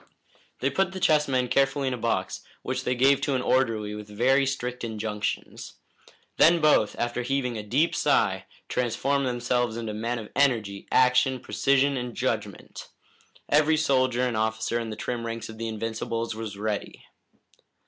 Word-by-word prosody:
They 135 - +1
put 190 +4 0
the 190 - -5
chess 150 -4 +3
men 130 -2 +1
carefully 135 +2 +1
in 130 - 0
a - - -1
box, 95 -5 -1 0.2
which - - -3
they 125 - +1
gave 135 +2 +4
to 140 - 0
an 125 - -1
orderly 115 -5 +1
with 105 0 -8
very 130 +6 +2
strict 125 -2 -3
injunctions. 110 -2 -4 0.6
Then 170 +1 +6
both, 150 -9 +3
after 120 +1 -1
heaving 125 -1 -1
a 110 - -3
deep 130 +11 +1
sigh, - - +1 0.2
transformed 130 +3 0
themselves 120 -1 -1
into 115 -2 -4
men 115 +3 -2
of 110 -2 -7
energy, 110 -8 +1
action, 130 +1 +3
precision 140 +2 +1
and 125 -1 -5
judgment. - - -4 0.6
Every 155 +2 +3
soldier 130 -4 +2
and 120 -2 -1
officer 110 +1 -1
in 115 -1 -4
the 110 - -5
trim 120 +2 -4
ranks 115 -1 -5
of 110 0 -10
the 115 - -3
Invincibles 115 +1 -3
was 110 -2 -6
ready. 105 0 -4
125 Hz, 165 wpm, -26 LUFS, 110-135 Hz, 0.6 s, Then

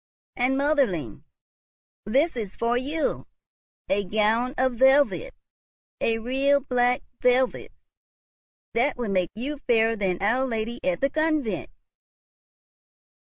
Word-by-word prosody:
And, 255 +1 +1
motherling, 260 - 0 0.8
this 280 +9 +2
is 215 -5 -5
for 235 +1 0
you, 290 +5 -2 0.6
a 200 +1 +1
gown 220 +6 0
of 260 0 +2
velvet, 275 - +3 0.6
a 225 0 +1
real 270 +5 +2
black 250 -2 +1 0.2
velvet, 250 +1 +1 1.0
that 255 +4 +1
will 235 -4 -3
make 185 -3 +1
you 275 +6 -5
fairer 225 -1 +3
than 190 -4 -1
our 245 +7 +1
Lady 230 0 -3
at 180 -1 -1
the 275 - +2
Convent. 310 -6 -1
245 Hz, 115 wpm, -25 LUFS, 220-275 Hz, 1.0 s, velvet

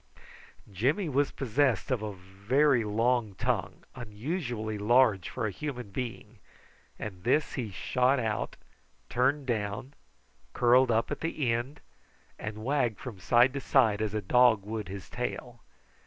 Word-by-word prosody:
Jimmy 140 - 0
was 140 0 +2
possessed 135 0 0
of 125 -4 0
a 105 -1 -3
very 100 +8 +1
long 110 0 0
tongue, 95 -6 -2
unusually 120 - -4
large 110 -3 +3
for 125 - -3
a 105 - -1
human 125 -2 -6
being, 120 +1 -6 0.6
and 95 -4 -7
this 150 +6 +1
he 120 -5 -3
shot 125 +7 +1
out, 110 -3 -2 0.5
turned 135 +3 +1
down, 110 +2 -3 0.6
curled 125 +1 +4
up 115 0 +1
at - - -3
the 155 -6 -1
end, 125 +5 -4 0.6
and 105 0 -6
wagged 125 -6 +1
from 115 -7 -8
side 120 +7 +4
to 140 - -2
side 110 -7 +3
as 110 -1 -2
a 105 - -2
dog 120 -1 +4
would 110 -2 -4
his 95 -1 -7
tail. 120 0 -5
120 Hz, 140 wpm, -29 LUFS, 105-130 Hz, 0.6 s, curled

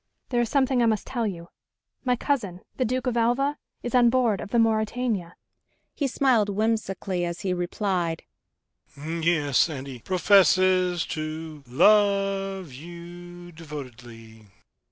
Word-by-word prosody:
"There 240 -2 +1
is 235 - -1
something 265 -3 +2
I 235 - +4
must 215 -3 0
tell 240 -4 -2
you... 170 -3 -7 0.5
my 250 -2 +2
cousin, 210 -9 -2 0.2
the 255 - +1
Duke 255 +1 -2
of 250 -2 -1
Alva, 250 +5 +1 0.2
is 240 - -4
on 245 -2 +5
board 235 -5 +1
of - - -7
the 240 - 0
Mauretania." 220 -4 0 0.6
He 285 - -1
smiled 250 -5 +2
whimsically 200 -3 -1
as 170 +1 -4
he 190 -3 -1
replied, 175 -2 -2 0.7
"Yes, 160 -1 +1
and 140 -4 -6
he 130 -3 -8
professes 185 - +3
to 155 -1 -6
love 195 - +2
you 175 +3 -11
devotedly." 120 -8 -11
190 Hz, 135 wpm, -25 LUFS, 165-230 Hz, 0.7 s, on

